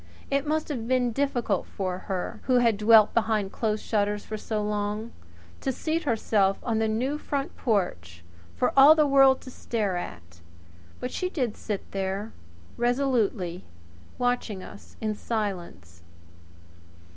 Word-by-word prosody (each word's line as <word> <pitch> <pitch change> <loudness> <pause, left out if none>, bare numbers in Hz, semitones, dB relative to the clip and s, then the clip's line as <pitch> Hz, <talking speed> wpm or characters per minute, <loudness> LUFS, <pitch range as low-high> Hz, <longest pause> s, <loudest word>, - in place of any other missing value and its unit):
It 280 +1 +1
must 310 +1 0
have 240 -6 -3
been 250 -1 +2
difficult 240 -6 0
for 185 -2 -3
her, 185 -2 -3
who 255 - +3
had 235 -3 +4
dwelt 215 0 +6
behind 215 -3 +1
closed 215 -2 -1
shutters 210 -1 0 0.2
so 215 -2 -2
long, 210 +2 -2 0.5
to 265 - -1
seat 320 +5 -2
herself 210 -5 +2
on 225 -3 0
the 220 - +1
new 255 +7 -1
front 280 -2 -3
porch 90 - -2 0.3
for - - +1
all 280 +3 +9
the 305 -1 +4
world 270 -1 +5
to 255 - -10
stare 210 -7 -2
at; 85 - -8 0.6
but 250 - -4
she 365 - -2
did 250 - -2
sit 205 -3 -5
there 195 +3 -3 0.5
resolutely 235 -8 0 0.5
watching 245 -6 -1
us - - -13
in 215 -1 0
silence. 175 - -4
220 Hz, 140 wpm, -26 LUFS, 195-255 Hz, 0.6 s, all